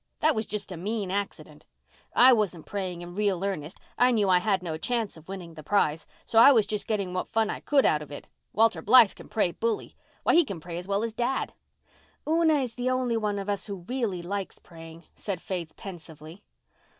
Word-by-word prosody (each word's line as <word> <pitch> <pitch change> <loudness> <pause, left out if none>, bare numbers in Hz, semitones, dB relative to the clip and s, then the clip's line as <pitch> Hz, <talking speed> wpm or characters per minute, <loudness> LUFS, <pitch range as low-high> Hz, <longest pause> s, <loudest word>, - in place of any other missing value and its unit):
That 315 +1 +4
was 220 -3 -3
just 210 -2 -3
a 180 - -6
mean 200 +1 -3
accident. 200 +1 -5 0.5
I 255 +1 +8
wasn't 195 -8 -1
praying 185 -4 -4
in 175 0 -9
real 195 -2 0
earnest—I 195 +7 -1
knew 215 -5 +2
I 180 -1 +5
had 190 -1 0
no 165 -3 -3
chance 225 +5 -2
of 160 +2 -16
winning 180 -4 -7
the 155 - -10
prize. 160 -2 0 0.2
So 225 - +3
I 255 +5 +9
was 225 -6 +4
just 210 -1 -3
getting 200 -4 -1
what 185 - -2
fun 220 -1 0
I - - -5
could 285 -2 +2
out 150 - +3
of 145 -1 -10
it. 145 - -9 0.2
Walter 225 +2 +2
Blythe 230 -1 +7
can - - -14
pray 205 -5 +1
bully. 225 +4 -3 0.3
Why, - - +3
he 340 - +6
can 200 - -6
pray 170 +1 -6
as 180 - -9
well 200 +2 0
as 230 -1 -3
dad." 245 +3 -1 0.7
"Una 320 0 +3
is 250 -3 -4
the 245 +1 -2
only 255 -2 0
one 210 -2 -1
of 200 0 -5
US 200 -1 -2
who 195 -4 -7
really 230 -9 -2
likes 195 +2 -4
praying," 165 0 -13
said 195 -4 -5
Faith 175 -3 -5
pensively. 165 -1 -11
200 Hz, 210 wpm, -27 LUFS, 175-225 Hz, 0.7 s, I